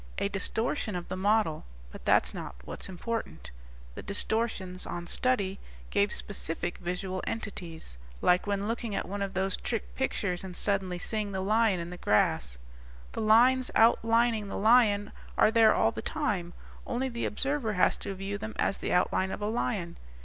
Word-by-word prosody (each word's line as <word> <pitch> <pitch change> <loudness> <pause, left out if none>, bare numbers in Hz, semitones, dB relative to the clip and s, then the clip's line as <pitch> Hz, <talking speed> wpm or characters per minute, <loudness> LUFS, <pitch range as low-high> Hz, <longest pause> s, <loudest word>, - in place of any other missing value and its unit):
"A 200 - 0
distortion 220 +2 -1
of 175 -1 -5
the - - -2
model. 200 -4 +1 0.3
But - - -11
that's - - +3
not - - -6
what's - - -6
important. 225 +5 -5 0.4
The - - -7
distortions, 200 -2 -2
on 175 0 -4
study, 200 -1 0 0.3
gave 205 +1 +2
specific 175 -3 -2
visual 180 +1 -3
entities. 175 - -6 0.2
Like 180 +3 +3
when 200 0 -1
looking 230 -2 -2
at - - -2
one 200 +1 -4
of 195 0 -3
those 190 0 +1
trick - - -4
pictures 175 - -1
and 185 -2 -7
suddenly 195 -3 0
seeing 210 +2 -3
the 190 - -1
lion 210 -1 +3
in 170 +1 -5
the 180 - -7
grass. 60 - +1 0.5
The - - -4
lines 245 +4 +5
outlining 230 -1 +4
the - - -4
lion 215 -2 +4 0.3
are 215 - +5
there 225 -1 +6
all - - +3
the - - -5
time, 205 - -2 0.3
only 255 +2 -1
the 235 -2 -3
observer 265 -1 -1
has 180 - +3
to 200 -1 -5
view 195 +2 -4
them 220 +1 -6
as 195 - +1
the - - -3
outline 185 +1 +2
of - - -4
a 205 - -2
lion. 210 -6 -2
200 Hz, 170 wpm, -29 LUFS, 180-225 Hz, 0.5 s, there